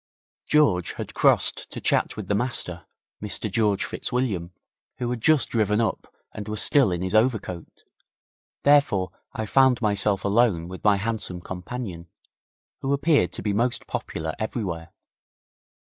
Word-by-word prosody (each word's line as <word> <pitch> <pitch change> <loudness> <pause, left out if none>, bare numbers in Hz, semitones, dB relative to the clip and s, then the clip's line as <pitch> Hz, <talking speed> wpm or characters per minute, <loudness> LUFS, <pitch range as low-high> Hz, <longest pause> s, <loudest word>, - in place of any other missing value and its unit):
George 105 - +3
had - - -7
crossed - - +2
to - - -7
chat - - +1
with 105 -4 -6
the 100 - 0
Master, 100 -6 -1 0.3
Mr 105 0 -3
George 105 -2 +1
Fitzwilliam, 105 -9 -2 0.5
who 120 - -2
had 120 -2 -3
just 155 +1 +3
driven 105 -2 +1
up 115 - -2 0.2
and 105 - -7
was 105 0 -2
still 135 -6 +4
in 90 0 -2
his 95 - -2
overcoat, 110 -7 0 0.8
therefore 140 - +3 0.2
I 110 - -3
found 130 +2 +4
myself 100 -3 +1
alone 100 -5 +2
with 95 +1 -9
my 105 -1 +5
handsome 105 -4 -3
companion, 90 -1 -6 0.7
who 135 +1 -1
appeared 140 - +2
to - - -5
be 105 - 0
most 120 +4 0
popular 80 0 -4
everywhere. 95 -7 -4
105 Hz, 145 wpm, -25 LUFS, 90-120 Hz, 0.8 s, my